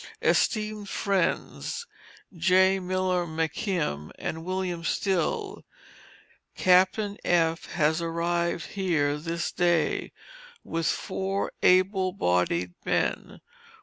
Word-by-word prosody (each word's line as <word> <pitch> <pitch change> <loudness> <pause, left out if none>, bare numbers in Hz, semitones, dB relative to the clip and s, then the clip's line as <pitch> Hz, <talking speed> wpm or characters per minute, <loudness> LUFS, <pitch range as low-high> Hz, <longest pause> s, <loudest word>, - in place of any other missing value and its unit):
ESTEEMED 215 -2 +1
FRIENDS, 200 - -1 0.5
J. 190 +3 +4
Miller 185 -1 0
McKim 160 - -2
and 160 0 -4
William 185 -1 -3
Still: 300 - -1 0.9
Captain 190 +3 +3
F., 165 -2 +1
has 160 0 +2
arrived 170 +1 -1
here 160 -7 0
this 170 +2 -3
day, 175 -3 +1 0.5
with 165 -1 -2
four 195 +1 -2
able 185 0 +3
bodied 90 - 0
men. - - -1
180 Hz, 85 wpm, -27 LUFS, 165-190 Hz, 0.9 s, J